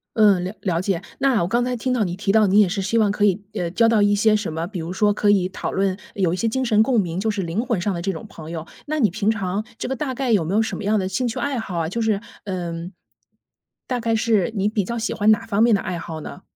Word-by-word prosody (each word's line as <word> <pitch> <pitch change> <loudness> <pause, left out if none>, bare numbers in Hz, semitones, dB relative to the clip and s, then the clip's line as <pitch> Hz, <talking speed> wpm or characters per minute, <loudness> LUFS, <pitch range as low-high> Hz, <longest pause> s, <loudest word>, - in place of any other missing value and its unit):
嗯， 205 -5 +5
了 185 +3 -4
了 175 -3 0
解。 190 -3 -1 0.2
那 260 -9 +2
我 - - 0
刚 240 +4 +1
才 250 0 -1
听 250 +2 -1
到 230 -4 +2
你 175 -2 -2
提 195 +1 0
到， 215 -1 +4
你 200 +3 +4
也 205 - +6
是 195 +2 -2
希 210 +4 0
望 210 -2 +3
可 205 0 -1
以， 200 0 +2
呃， 175 -5 -2
交 230 +6 +3
到 225 -2 +3
一 205 0 +4
些 215 +1 +4
什 210 -5 -2
么 160 +1 -3
比 185 -1 -6
如 165 +2 -5
说 205 +2 +2
可 205 0 +1
以 190 -3 +4
讨 - - -4
论 195 -1 0 0.2
有 185 -4 +1
一 185 - -2
些 230 - 0
精 260 +3 -1
神 215 -3 +4
共 235 -1 +3
鸣 175 -2 -2
就 220 +3 0
是 200 -3 -1
灵 170 +7 -2
魂 230 -7 0
上 195 +2 -1
的 170 - -4
这 195 +2 -1
种 160 - -7
朋 160 -1 -10
友， 165 -1 -5 0.2
那 310 0 -1
你 220 - +4
平 210 +2 0
常 200 -1 -1
这 - - -4
个 265 - -2
大 265 +1 -3
概 255 -2 -1
有 200 -7 +3
没 180 +6 -2
有 220 - +4
什 220 - -2
么 - - -6
样 210 +2 +2
的 185 - -1
兴 235 +7 -1
趣 225 - -3
爱 280 -3 -1
好 190 -6 -5
啊， 165 -1 -1
就 230 +6 -2
是 220 -3 +1 0.3
嗯， 175 -2 -4 0.9
大 250 -1 -2
概 225 -1 0
是 225 -3 +2
你 200 +1 +1
比 210 -1 0
较 235 +6 -4
喜 225 - -2
欢 210 +1 +2
哪 215 - +4
方 210 -1 0
面 230 -2 +5
的 200 - -1
爱 175 -2 -4
好 160 -1 -6
呢？ - - -9
205 Hz, 325 characters per minute, -22 LUFS, 185-225 Hz, 0.9 s, 也